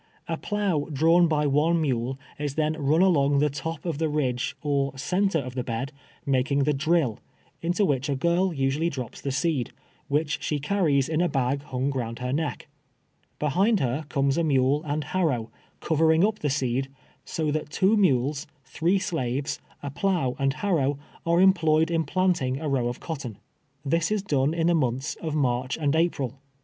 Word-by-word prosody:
A 165 - -1
plough 195 -5 -1
drawn 165 +4 +4
by 150 -2 +1
one 150 +4 +2
mule 130 -3 -1 0.2
is 145 -2 -3
thiMi 155 0 +1
run 150 +5 +3
along 145 -6 +3
the 150 +1 +2
top 155 +4 -5
of 165 -4 -2
the 160 -1 +1
ridge 135 -3 -1
or 140 -2 0
center 185 +5 +1
of 130 -4 -4
the 125 -1 -2
bed, 120 +3 -3 0.3
making 140 +1 +1
the 150 +2 +2
drill, 155 -5 +1 0.4
into 175 +5 +1
which 140 -3 0
a 140 - +1
girl 170 +6 +1
usually 140 +2 0
drops 130 -6 -6
the 140 - -2
seed, 140 -2 0 0.4
which 150 +1 0
she 150 - -1
carries 145 -4 +1
in 155 +1 0
a 175 - +2
bag 135 0 0
hung 130 0 -1
round 115 -4 -3
her 125 +1 -3
neck. 155 +1 -2 0.7
Behind 190 - +2
her 135 +3 -1
comes 140 +1 +1
a - - +2
mule 140 -1 +2
and 150 +1 -1
liarrow, 145 -8 -1 0.3
covering 160 +2 +3
up 215 0 -1
the 150 - -1
seed, 135 -1 -1 0.3
so 155 -2 -2
that 150 0 -2
two 190 +7 +3
mules, 145 - +2 0.2
three 170 +8 +1
shives, 145 -6 -2 0.2
a 140 - -4
plough 165 -5 0
and 135 0 +1
harrow, 150 -9 0 0.3
are 170 +1 +3
employed 165 -4 +4
in 165 -1 +1
planting 145 -6 0
a 155 - -4
row 130 -4 +1
of 120 +1 -4
cotton. 135 - -6 0.5
This 165 +3 +1
is 210 -2 0
done 145 -4 +1
in 165 -1 0
the 175 - +4
months 135 -3 0
of 155 -2 -3
March 130 -3 0
and 145 -2 +1
April. 140 -6 0
150 Hz, 180 wpm, -26 LUFS, 135-165 Hz, 0.7 s, drawn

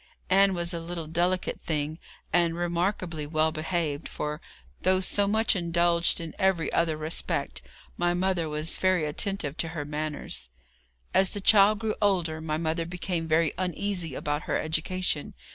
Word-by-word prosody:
Ann 195 0 +5
was 170 0 -1
a 170 - -2
little 165 0 -5
delicate 175 +3 0
thing, 155 0 -2 0.3
and 170 -1 +3
remarkably 175 -2 -1
well 155 +1 +2
behaved, 155 -2 -2
for, 150 +1 -4 0.4
though 185 0 +3
so 200 +2 +1
much 220 +2 +2
indulged 170 -1 +2
in 165 -2 -6
every 190 -4 +1
other 165 -2 +1
respect, 155 - -1 0.4
my 175 0 +1
mother 180 -3 0
was 150 +2 0
very 185 -4 +2
attentive 155 -1 -2
to 165 - 0
her 145 - -2
manners. 150 - -4 0.6
As 190 -1 +5
the 205 - -5
child 205 +1 +6
grew 220 0 -1
older 175 -6 +1
my 155 -1 -1
mother 165 +1 -1
became 175 -1 -3
very 160 0 +2
uneasy 180 -4 -2
about 150 0 -2
her - - +2
education. 160 0 -1
170 Hz, 155 wpm, -27 LUFS, 155-185 Hz, 0.6 s, child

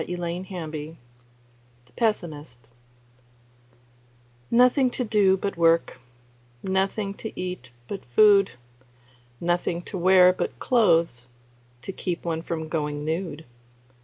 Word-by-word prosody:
Ben 175 +1 -4
King 160 -4 -7 0.9
The - - -26
Pessimist 150 - -3 1.8
NOTHING 250 +2 +4
to 250 - -3
do 205 -4 +3
but 200 -1 -4
work, 165 0 +2 0.6
Nothing 195 +2 -1
to 220 +2 -7
eat 180 -9 -5 0.2
but 195 - -6
food, 200 - +5 0.9
Nothing 175 0 -1
to 190 - -6
wear 185 0 +6
but - - -4
clothes 165 - +2 0.6
To - - -5
keep 180 -2 -4
one 165 -1 -2
from 160 -1 -4
going 150 -2 -3
nude. 160 -1 -3
175 Hz, 105 wpm, -25 LUFS, 160-195 Hz, 1.8 s, wear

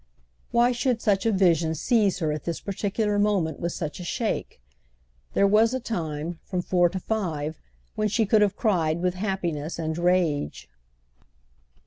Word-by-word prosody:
Why 240 +1 +3
should 245 -1 0
such 205 -1 +1
a - - +3
vision 170 -5 +2
seize 210 - +2
her 160 -4 -1
at 150 -1 -4
this 170 -1 -2
particular 205 +1 -1
moment 200 -6 +1
with 170 0 -2
such 155 -1 -5
a - - -6
shake? 220 - -3 0.8
There 200 - +4
was 220 +4 +4
a - - -1
time—from 170 -3 -4
four 175 -1 +3
to 190 - -4
five—when 155 - -4
she 220 +2 +1
could 210 +1 +4
have 205 -2 +2
cried 170 -8 +1
with 180 0 0
happiness 175 -6 -3
and 160 -1 -2
rage. 165 - 0
185 Hz, 150 wpm, -25 LUFS, 160-210 Hz, 0.8 s, There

